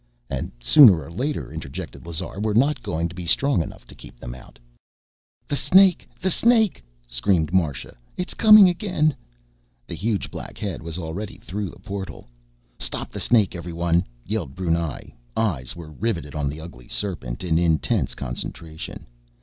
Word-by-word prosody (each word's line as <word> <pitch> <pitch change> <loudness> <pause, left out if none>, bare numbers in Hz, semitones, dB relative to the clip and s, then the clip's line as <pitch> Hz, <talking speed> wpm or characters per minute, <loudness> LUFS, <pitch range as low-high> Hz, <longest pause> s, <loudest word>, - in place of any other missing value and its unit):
"And - - -3
sooner 95 - +8
or 80 - -11
later," 135 - -3
interjected 80 +1 -7
Lazar, 85 +3 -3
"we're 105 0 0
not 140 +6 +3
going 85 +1 -2
to 85 - -10
be 90 -1 -7
strong 135 - +3
enough - - -8
to - - -13
keep - - -14
them - - -7
out...." 65 - -14
"Brr!" - - -38
"The - - +1
snake! 185 +6 +5
The 190 - 0
snake!" 225 - +4 0.2
screamed 80 +7 +1
Marsha. 75 -8 0 0.2
"It's 180 - -3
coming 215 -2 +9
in 180 - +5
again!" 170 -6 0 0.7
The - - -7
huge 100 +5 -2
black - - -8
head 100 -4 -4
was 80 0 -6
already 90 +4 -5
through 100 -1 -5
a - - -15
portal. 100 -2 -7 0.5
"Stop - - -4
the - - -6
snake, 110 -5 +3
everyone!" 85 0 0 0.2
yelled 95 -10 -3
Brunei. 85 -4 -2 0.2
Eyes 85 - -1
were 80 -2 -9
riveted 85 -4 -3
on 75 -2 -1
the 75 +3 -7
ugly 70 -7 -11
serpent, 85 -10 -4
in 85 -2 +2
intense 80 -5 +1
concentration. 80 +5 -6
85 Hz, 165 wpm, -23 LUFS, 80-110 Hz, 0.7 s, coming